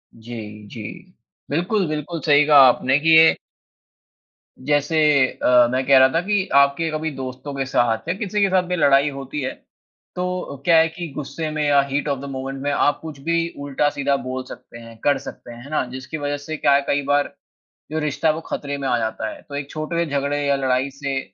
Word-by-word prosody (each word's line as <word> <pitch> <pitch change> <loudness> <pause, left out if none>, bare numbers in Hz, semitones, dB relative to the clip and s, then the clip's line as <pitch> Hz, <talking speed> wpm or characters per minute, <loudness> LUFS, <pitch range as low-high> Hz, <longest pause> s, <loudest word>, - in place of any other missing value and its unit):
जी, 110 -2 -9
जी। 110 +1 -9 0.7
बिल्कुल, 180 +5 0
बिल्कुल 155 +2 -4
सही 145 -1 +5
कहा 150 -2 +7
आपने 130 +2 +3
कि 160 +1 +5
ये 160 0 +6 1.3
जैसे 145 +2 +1 0.3
अ, 125 -1 +3
मैं 130 +1 -1
कह 140 - +7
रहा 130 - +7
था 165 - +2
कि 205 -1 0
आपके 140 +3 +3
कभी 155 +1 -2
दोस्तों 130 +2 -7
के 135 -1 -2
साथ 120 -1 0
या - - +2
किसी 210 -1 -2
के 200 - +3
साथ 185 -1 +2
भी 180 - -1
लड़ाई 145 -3 +4
होती 140 +1 -6
है, 130 - -2 0.6
तो 180 0 -2
अ, 140 -5 -9
क्या 170 -2 +5
है 160 0 +5
कि 170 +1 -7
गुस्से 155 +2 -4
में 155 0 -2
या 145 -1 +4
हीट 145 +2 -1
ऑफ़ 140 - -1
द 140 - -8
मोमेंट 135 0 -5
में 145 - 0
आप 145 +1 +1
कुछ 155 -3 -9
भी 170 0 +1 0.2
उल्टा-सीधा 140 0 0
बोल 130 0 -4
सकते - - -11
हैं, 115 0 -13
कर 145 -1 +3
सकते 120 - -10
हैं, 120 +1 -11
है 140 - -12
ना? 155 - 0
जिसकी 130 +4 -6
वज़ह 145 -1 -2
से 155 -1 -4
क्या 140 - +3
है 140 - +3
कई 145 0 +1
बार 145 0 +1 0.6
जो 155 - -1
रिश्ता 150 +1 -1
है 155 - +4
वो 165 - -6
ख़तरे 145 0 -4
में 140 -1 -3
आ 120 - +2
जाता 110 -1 -3
है, - - -10
तो 140 - -10
एक 140 0 -5
छोट 155 +1 -5
वे 170 0 +1
झगड़े 145 -1 -1
या 140 - +3
लड़ाई 130 0 0
से 140 -1 -3
145 Hz, 220 wpm, -21 LUFS, 135-155 Hz, 1.3 s, कहा